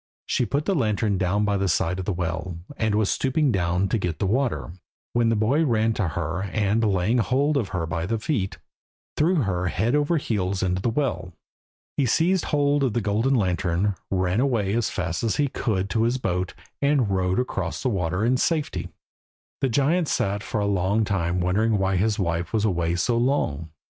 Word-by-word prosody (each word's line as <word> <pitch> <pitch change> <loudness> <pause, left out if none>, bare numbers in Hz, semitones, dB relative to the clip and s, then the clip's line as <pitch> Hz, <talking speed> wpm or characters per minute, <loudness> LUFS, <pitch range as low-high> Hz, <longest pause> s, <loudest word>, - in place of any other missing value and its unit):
She 125 - 0
put 145 +2 -1
the 200 - +1
lantern 105 - 0
down 100 +3 +1
by 100 -1 +1
the 100 0 0
side 90 +1 0
of 95 - -4
the 105 - 0
well, 85 0 -3 0.2
and 110 -4 0
was 105 -1 +2
stooping 135 +1 +1
down 90 -1 +1
to 115 - +1
get 85 -4 -2
the - - -1
water, 95 - -1 0.4
when 120 -1 +3
the 115 - +2
boy 120 +9 +2
ran 115 -5 +2
to 100 -4 -1
her, 80 +2 -3
and, 100 +2 0
laying 105 +3 +2
hold 140 +6 +1
of 125 -8 0
her 90 -3 -2
by 80 +1 -3
the 115 +2 0
feet, 110 -4 -2 0.6
threw 170 +5 +2
her 90 -3 -1
head 110 +8 0
over 150 +3 +2
heels 100 -8 -1
into 90 0 0
the 120 - +1
well. 110 - -2 0.6
He 135 - +2
seized 175 +9 +2
hold 145 -1 +2
of 130 -5 +1
the 120 - 0
golden 110 +6 +1
lantern, 95 -1 +1 0.2
ran 95 +1 0
away 115 -7 +1
as 115 -1 +1
fast 85 -4 -3
as 115 - +1
he 145 - +2
could 100 -6 -1
to 115 - +1
his 120 +3 +2
boat, 90 -6 -2 0.3
and 140 -7 +2
rowed 95 -1 +1
across 95 -9 -3
the 130 - +2
water 90 -1 -1
in 125 +2 +3
safety. 155 +1 -1 0.7
The 135 - +1
giant 150 +7 +2
sat 100 -5 0
for 110 - -3
a 100 - 0
long 100 +2 +1
time 90 -3 0
wondering 105 +5 +2
why 95 -1 +1
his 105 +3 +1
wife 85 -1 -2
was 110 -1 +1
away 85 -4 0
so 115 +7 +1
long. 85 - 0
105 Hz, 200 wpm, -24 LUFS, 90-125 Hz, 0.7 s, when